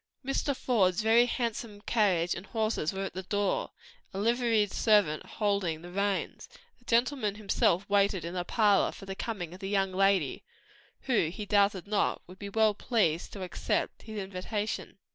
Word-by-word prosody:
Mr. 275 +1 0
Faude's 215 -6 +1
very 230 +2 +5
handsome 230 -4 -3
carriage 185 -7 +2
and 175 - -8
horses 220 -8 -1
were 195 0 -4
at 195 - -5
the 185 - -4
door, 205 +1 -1 0.5
a - - -3
liveried 225 -1 +2
servant 205 -9 +3
holding 200 -6 -1
the 175 - -9
reins, 200 +1 -2
while - - -19 0.2
the 245 - -27
gentleman 235 -3 +1
himself 200 -2 +1
waited 200 -3 +2
in 170 - -5
the 180 -1 -2
parlor 205 +1 +3
for - - -11
the 195 - -5
coming 190 -5 -5
of 185 - -11
the 195 - -5
young 195 -2 +1
lady, 190 -6 +1 0.6
who, 240 -11 +1
he 185 +6 -6
doubted 200 -2 +2
not, 205 0 0
would 185 +1 -14
be 200 - -6
well 220 +1 +3
pleased 195 -7 0
to 195 - -6
accept 180 - -2
his 220 -1 -8
invitation. 200 +2 -4
200 Hz, 175 wpm, -29 LUFS, 185-220 Hz, 0.6 s, very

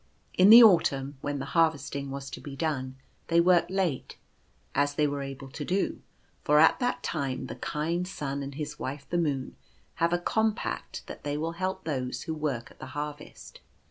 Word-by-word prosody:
In 185 +2 +6
the 235 +2 +12
autumn, 140 -9 +3
when 145 0 -2
the 135 - -4
harvesting 145 -4 +1
was 135 0 -6
to - - -7
be 140 -2 -8
done, 135 -4 -2 0.3
they 170 0 +3
worked 175 0 +4
late, 185 -8 -2 0.6
as 145 0 +1
they 150 - +2
were 145 -1 -2
able 135 0 -7
to 150 - -5
do; 185 +6 -1 0.4
for 150 - +4
at 160 +1 +6
that 245 0 -1
time 135 -5 -2
the 125 - -6
kind 165 +7 -2
Sun 140 -6 -4
and 140 0 -6
his 150 0 -5
wife 140 +2 -5
the 175 - +2
Moon 140 -5 -1 0.5
have 165 0 +3
a 175 - +3
compact 220 +5 -2
that - - -10
they 145 0 -2
will 160 +2 -2
help 185 +3 -3
those 130 -5 -3
who 160 - -3
work 145 -7 -3
at - - -20
the - - -8
harvest. 150 0 -7
150 Hz, 190 wpm, -28 LUFS, 140-170 Hz, 0.6 s, the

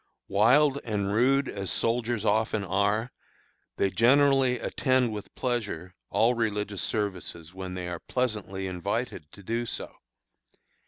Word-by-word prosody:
Wild 135 +8 +4
and 100 -3 -1
rude 135 +5 +3
as 100 -2 -4
soldiers 115 -1 0
often 110 0 +1
are, 100 +5 0 0.7
they 100 - +1
generally 130 +4 +4
attend 130 -3 +1
with 105 -1 -8
pleasure 105 -9 -3 0.2
all 115 +3 +3
religious 105 -4 -1
services 95 -5 -3
when 95 -1 -6
they 90 -1 -4
are 85 -1 -4
pleasantly 105 -6 -2
invited 95 -2 -3
to 100 - -13
do 115 +4 -2
so. - - -5
105 Hz, 125 wpm, -28 LUFS, 95-120 Hz, 0.7 s, Wild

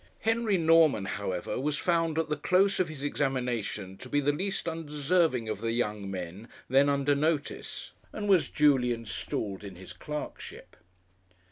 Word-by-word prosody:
Henry 225 -3 +2
Norman, 160 - +4
however, 95 -1 -3
was 150 +2 -1
found, 165 -2 +1
at 160 - +1
the 150 - 0
close 185 +6 +2
of 180 -3 +1
his 145 -3 -7
examination, 125 -9 -2
to 130 - -11
be 145 - +2
the 145 0 +2
least 190 +6 -2
undeserving 155 -4 0
of 110 -1 -3
the 115 0 -1
young 105 -4 -2
men 95 +3 -6 0.2
then 135 +3 +4
under 140 0 +2
notice, 150 +1 -2 0.2
and 210 -1 -4
was 190 -5 +4
duly 135 -5 +3
installed 105 -3 -4
in 100 -2 -8
his 95 +1 -9
clerkship. 150 -1 -7
145 Hz, 155 wpm, -29 LUFS, 115-165 Hz, 0.2 s, Norman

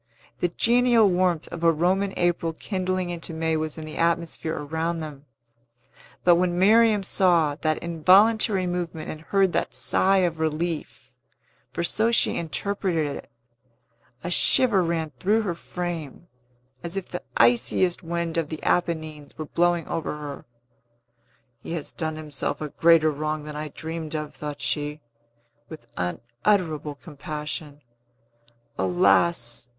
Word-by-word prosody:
The 175 - +2
genial 235 +3 +3
warmth 180 -3 +1
of 170 -1 -7
a 165 - +6
Roman 185 +5 +1
April 170 -2 0
kindling 185 0 -2
into 165 -1 -5
May 160 0 0
was 155 0 -3
in 155 - -6
the 155 - -8
atmosphere 165 -1 -1
around 160 +3 -2
them; 150 -3 -8 1.0
but 175 -1 +6
when 175 0 +1
Miriam 215 +2 +5
saw 175 -6 +3
that 155 -1 +1
involuntary 190 +4 +4
movement 175 -3 -3
and 155 - -9
heard 195 +2 +1
that - - -1
sigh 190 -1 +3
of 165 -2 -3
relief 160 +1 -3 0.6
(for 170 - -3
so 220 +6 +2
she 235 - +3
interpreted 170 -3 -1
it), - - -10 0.9
a 175 - -3
shiver 230 +1 +4
ran 165 -2 -1
through 215 - +2
her 185 -5 -1
frame, 170 -2 -6 0.5
as 170 +3 -4
if 195 - -4
the 180 - -5 0.2
iciest 120 +9 +3
wind 170 -1 -2
of 155 -2 -3
the 155 - -7
Apennines 155 -4 -1
were 155 - -4
blowing 175 +1 +1
over 165 -2 -3
her. 145 -2 -7 1.2
"He 165 - -6
has 160 -4 -3
done 160 -2 -3
himself 150 -3 -4
a 150 - -4
greater 160 0 +4
wrong 155 +1 -3
than 150 0 -8
I 150 +1 -4
dreamed 160 +1 -6
of," 150 -1 -4
thought 150 -1 -7
she, 150 +2 -2 0.7
with 160 - -10
unutterable 145 - -1
compassion. 150 -1 -7 1.0
"Alas! 170 -9 +2
165 Hz, 140 wpm, -25 LUFS, 155-180 Hz, 1.2 s, a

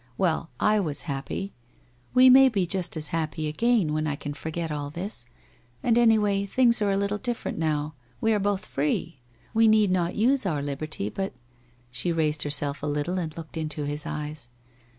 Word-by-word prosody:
Well, 170 -3 0
I 210 0 +3
was 155 -7 -1
happy. 140 +7 -4 0.6
We 255 +1 +8
may 265 +1 +8
be 200 -6 0
just 180 -1 -1
as 150 -1 -2
happy 155 -1 -2
again, 200 0 +1
when 155 0 -1
I 145 - -1
can 145 0 -6
forget 160 +2 -4
all 145 -1 -3
this. 170 - -6 0.6
And 235 - +3
any 230 -2 +5
way, 200 -2 +1
things 235 +1 +3
are 205 - +2
a 195 - +1
little 200 +1 -1
different 240 -8 -3
now. 155 -1 -1 0.3
We 225 0 +2
are 210 - +2
both 200 -1 -1
free. 150 +1 -2 0.3
We 225 0 +5
need 215 -3 +4
not 175 -1 0
use 255 +5 +3
our 155 -8 -1
liberty, 145 -6 -3
but 195 - -4 0.3
' 120 0 -34
She 130 +8 0
raised 155 -2 +1
herself 145 0 +1
a 145 - -3
little 150 +5 -1
and 160 -2 -5
looked 165 0 -8
into 155 -1 -3
his 145 +1 -3
eyes. 150 -4 -5
165 Hz, 190 wpm, -26 LUFS, 150-205 Hz, 0.6 s, We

